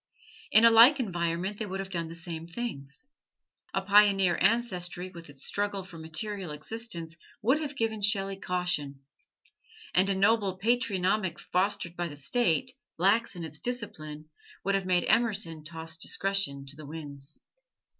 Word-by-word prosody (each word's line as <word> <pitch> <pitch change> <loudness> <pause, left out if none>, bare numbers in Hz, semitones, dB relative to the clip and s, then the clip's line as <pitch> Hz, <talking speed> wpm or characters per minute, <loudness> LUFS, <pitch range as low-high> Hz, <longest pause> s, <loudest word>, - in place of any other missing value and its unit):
In 220 +2 +7
a 230 - +9
like 240 +6 +8
environment 180 -2 -1
they 215 - -2
would 190 0 -4
have 195 0 -5
done 170 -2 -2
the 165 - -7
same 165 -1 -6
things. 170 - -5 0.6
A 195 - -1
pioneer 195 -2 +5
ancestry 185 -6 +1
with 170 -3 -11
its 140 -1 -8
struggle 200 -1 -1
for 180 -3 -10
material 175 +4 -4
existence 170 +1 -4 0.3
would 265 +8 +3
have 290 -2 -4
given 220 -3 -1
Shelley 195 -1 +1
caution; 180 -8 -1 0.9
and 190 +2 +4
a 195 - +2
noble 200 -1 +2
patronymic, 195 -4 +1
fostered 190 -2 -1
by 175 0 -2
the 145 - -8
State, 175 - +1 0.3
lax 200 +4 +3
in 175 - -6
its 155 -2 -8
discipline, 155 -11 -4 0.4
would 200 - +1
have 195 -1 0
made 180 -1 +2
Emerson 205 -8 +1
toss 160 0 -4
discretion 175 -6 0
to 140 +1 -9
the 155 -1 -10
winds. 145 -2 -5
185 Hz, 155 wpm, -29 LUFS, 165-210 Hz, 0.9 s, a